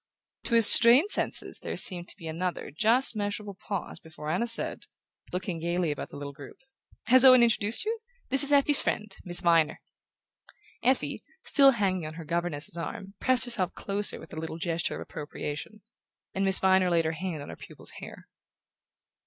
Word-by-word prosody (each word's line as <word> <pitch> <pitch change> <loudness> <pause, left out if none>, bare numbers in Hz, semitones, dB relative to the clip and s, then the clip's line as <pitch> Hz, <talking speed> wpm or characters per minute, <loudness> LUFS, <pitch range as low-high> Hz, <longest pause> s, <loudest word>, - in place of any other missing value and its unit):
To 235 - 0
his 230 -1 +9
strained 250 - +8
senses - - -3
there - - -7
seemed 175 -2 -4
to - - -8
be 165 - -10
another 175 +3 -5
just 230 +6 +2
measurable 205 0 -5
pause 195 0 -7
before 155 -1 -9
Anna 190 +8 -1
said, 230 - +2 0.4
looking 180 -2 -5
gaily 170 0 -2
about 145 - -7
the - - -11
little 140 0 -8
group: 140 -1 -13 0.5
"Has 255 +3 +5
Owen 255 -2 +7
introduced 225 - +1
you? 450 +1 -3 0.3
This 270 +1 +3
is 285 0 +2
Effie's 285 0 +5
friend, 210 -2 -3
Miss 175 -1 0
Viner." 165 -2 +1 1.0
Effie, 260 +1 -1 0.2
still 275 -2 +5
hanging 185 -7 -2
on 155 - -10
her 165 -1 -10
governess's 170 -1 0
arm, 195 +4 -7
pressed 255 -1 +3
herself 205 -7 -2
closer 205 +1 -1
with - - -14
a 155 - -6
little 160 0 -7
gesture 170 -1 -3
of - - -8
appropriation; 150 +7 -8 0.5
and 195 - -2
Miss 190 0 +7
Viner 190 -1 +2
laid 170 -2 0
her 160 - -1
hand 165 -3 -6
on - - -12
her - - -9
pupil's - - -8
hair. - - -12
190 Hz, 180 wpm, -26 LUFS, 165-230 Hz, 1.0 s, his